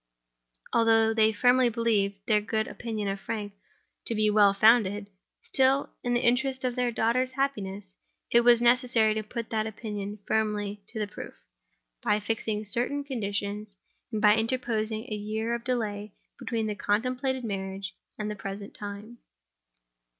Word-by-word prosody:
Although 225 -1 +4
they 220 -1 +4
firmly 245 +3 +4
believed 205 -4 0
their 210 -2 +3
good 220 +1 -1
opinion 220 -3 -4
of 195 0 -2
Frank 205 -2 -4 0.5
to 230 - -1
be 215 0 +3
well 205 -1 +6
founded—still, 215 +5 +2
in 245 0 0
the 240 - +2
interest 260 +2 +1
of 250 -1 -1
their 250 -1 +1
daughter's 250 +3 +1
happiness, 205 -8 -3 0.4
it 235 - +6
was 240 0 +5
necessary 240 -3 +4
to 215 - -2
put 230 +1 -6
that 220 -1 0
opinion 210 -1 -5
firmly 210 -2 -1
to 230 - -9
the 215 - 0
proof, 205 - -9 0.7
by 210 - +2
fixing 215 0 -2
certain 245 +7 -1
conditions, 205 -5 -4 0.4
and 215 -1 -2
by 210 0 +7
interposing 225 -2 -1
a 230 -4 -5
year 220 +2 -2
of 235 0 -3
delay 215 -5 -3 0.2
between 225 -2 -2
the 215 - -1
contemplated 255 +6 -1
marriage 195 -3 -4 0.2
and 210 0 -3
the - - -4
present 200 0 -7
time. 210 +3 -8
220 Hz, 150 wpm, -28 LUFS, 205-240 Hz, 0.7 s, by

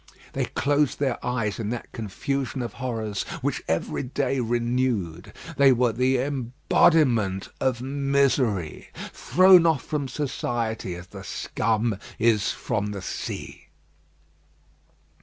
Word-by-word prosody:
They - - 0
closed 145 0 +1
their 135 -4 -1
eyes 115 -4 -1
in 110 -2 -2
that 120 0 -5
confusion 130 +4 -3
of 120 - -5
horrors 110 -5 -2 0.2
which - - -1
every 80 +1 -1
day 135 0 -1
renewed. 120 -7 -1 0.3
They 140 -1 +7
were 125 -1 +3
the 130 +3 +2
embodiment 125 - +2
of 125 -2 0
misery, 135 - 0 0.2
thrown 185 -1 +6
off 160 -5 +2
from 145 -3 -2
society, 120 -8 -2
as 90 +1 -9
the 95 +1 -10
scum 110 +2 -1 0.2
is 110 -3 +3
from 105 -4 -2
the 100 -2 -5
sea. - - -6
120 Hz, 120 wpm, -25 LUFS, 105-135 Hz, 0.3 s, They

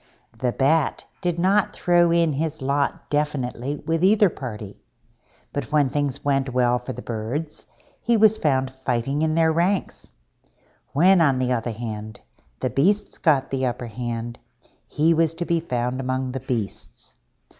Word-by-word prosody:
The 125 +2 -1
Bat 140 +4 +1 0.2
did 175 -1 -1
not 195 +3 +2
throw 175 -1 +3
in 170 -2 +2
his 155 0 -3
lot 140 +1 -1
definitely 145 -2 -1
with 165 +1 0
either 205 -1 +5
party, 105 -8 -7 0.8
but 145 - -4
when 145 -3 +3
things 145 0 -2
went 135 -2 +1
well 125 0 +2
for 125 - -7
the 125 - -8
Birds 120 +8 -5 0.3
he 235 -1 +2
was 220 0 +5
found 130 -3 +1
fighting 130 +2 -2
in 160 0 +1
their 160 -1 +3
ranks; 180 +4 -1 0.8
when, 180 +5 +5
on 140 -5 +3
the 130 0 0
other 120 0 -2
hand, 110 -1 -6 0.4
the - - -1
Beasts 200 +9 +1
got 145 -6 +2
the 130 -1 0
upper 120 0 -4
hand, 120 0 -5 0.5
he 160 +3 +2
was 165 0 +1
to 175 - -3
be 170 -1 +1
found 125 -5 -2
among 130 0 -2
the 130 - -4
Beasts. 120 -6 -5
140 Hz, 155 wpm, -23 LUFS, 125-165 Hz, 0.8 s, either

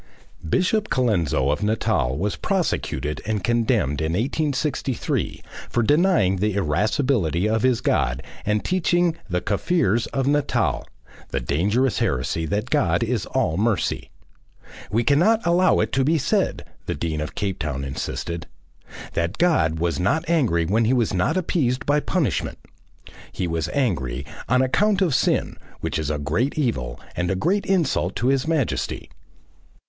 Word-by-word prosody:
Bishop 210 - +1
Colenso 85 - +1
of 75 - -1
Natal 105 - 0
was 100 +5 -1
prosecuted 175 - -1
and 105 -3 -2
condemned 115 - +1
in 80 +1 -1
1863 135 - -1 0.3
for 120 - +1
denying 145 - +3
the 105 +1 0
irascibility 100 - +1
of 110 0 +1
his 130 -1 +2
God 60 +2 0 0.2
and 105 0 0
teaching 175 -2 +2
"the 90 0 0
Kaffirs 110 - +1
of 135 -1 -1
Natal" 145 0 +1 0.4
the - - -1
dangerous 100 - +1
heresy 70 +6 -1
that 105 +6 -2
God 90 - +2
is 115 -1 -1
all 115 -11 0
mercy. 105 - 0 0.8
"We 115 +5 +1
cannot 175 - +3
allow 175 +2 +4
it 110 +1 -1
to 135 - +2
be 160 +4 +3
said," 145 - 0 0.2
the - - -1
Dean 75 0 -2
of 75 - -5
Cape 95 -3 -2
Town 70 -3 -3
insisted, 80 +5 -4 0.7
"that 85 +4 -1
God 165 - +2
was 85 +1 -1
not 135 - +1
angry 130 - +2
and 110 +7 +2
was 115 -5 +1
not 95 - +1
appeased 135 -8 0
by 145 +1 +3
punishment." 145 - -1 0.7
He 90 - -3
was 85 -1 -2
angry 70 - -1 0.2
"on 125 +2 +4
account 200 +9 +2
of 170 -6 +1
Sin, - - +1 0.2
which - - -2
is 75 -2 -2
a 75 - -1
great 85 - -1
evil 65 - -1 0.2
and 90 0 -1
a 95 - +1
great 185 - 0
insult 160 - +1
to 125 - +1
His 135 +1 +1
Majesty." 155 -7 -1
110 Hz, 150 wpm, -23 LUFS, -, 0.8 s, allow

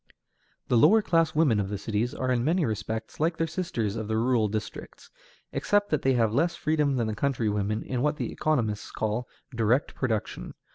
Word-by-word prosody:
The 120 - +3
lower 210 - +6
class 165 -3 +2
women 145 -9 +3
of 100 -1 -2
the 100 - -3
cities 110 +4 -2
are 130 0 -1
in 120 -2 +1
many 165 +4 +2
respects 110 +1 -4
like 160 +2 +1
their 165 - +1
sisters 155 - -2
of 110 -2 -4
the 110 0 0
rural 115 -1 +2
districts, 105 +1 -6 0.4
except 205 0 +1
that 150 - +1
they 135 - +2
have 115 -3 +2
less 165 +7 +1
freedom 150 -2 +1
than 120 -3 0
the 110 - -2
country 120 -1 0
women 105 +1 -1
in 125 -2 -3
what 150 +2 +1
the - - -3
economists 115 -9 -1
call 110 +3 -2 0.3
"direct 115 +5 +1
production." 110 -5 -3
120 Hz, 195 wpm, -27 LUFS, 110-150 Hz, 0.4 s, lower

